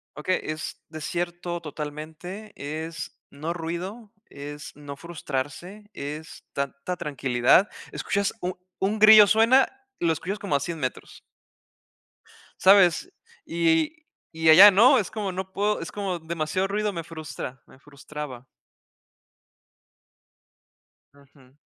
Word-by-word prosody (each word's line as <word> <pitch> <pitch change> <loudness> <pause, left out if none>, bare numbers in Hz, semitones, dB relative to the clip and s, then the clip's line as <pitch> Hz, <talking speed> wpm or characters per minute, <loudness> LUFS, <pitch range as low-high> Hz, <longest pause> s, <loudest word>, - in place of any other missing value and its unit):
Okey, 185 +5 0
es 155 0 -5
desierto 175 +2 -4
totalmente, 155 +6 -7
es 160 +2 -6
no 155 +4 -4
ruido, 175 +6 -5
es 145 +1 -9
no 145 -1 -9
frustrarse, 170 +6 -6
es 150 +3 -7
tanta 140 +5 -3
tranquilidad. 135 - +3 0.2
Escuchas 200 0 -1
u 180 -1 -3 0.2
un 205 +3 -1
grillo 215 0 +10
suena, 225 +6 +5 0.3
lo 165 -1 +2
escuchas 185 +6 -4
como 200 -7 -2
a - - +3
100 165 +4 -4
metros. 130 -4 -5 1.4
¿Sabes? 195 - +5 0.3
Y 165 - +1 0.3
y 160 0 +2
allá 195 +6 +11
no, 215 +6 +6
es 200 - -1
como 205 -3 -3
no 190 +1 -6
puedo, 210 +1 0
es 165 - -6
como 195 -3 -3
demasiado 165 +3 -2
ruido, 210 +1 -1
me 170 -3 -5
frustra, 155 -5 -8
me - - -18
frustraba. 140 -2 -9 2.7
Ujú. 140 -2 -22
165 Hz, 115 wpm, -25 LUFS, 150-195 Hz, 2.7 s, allá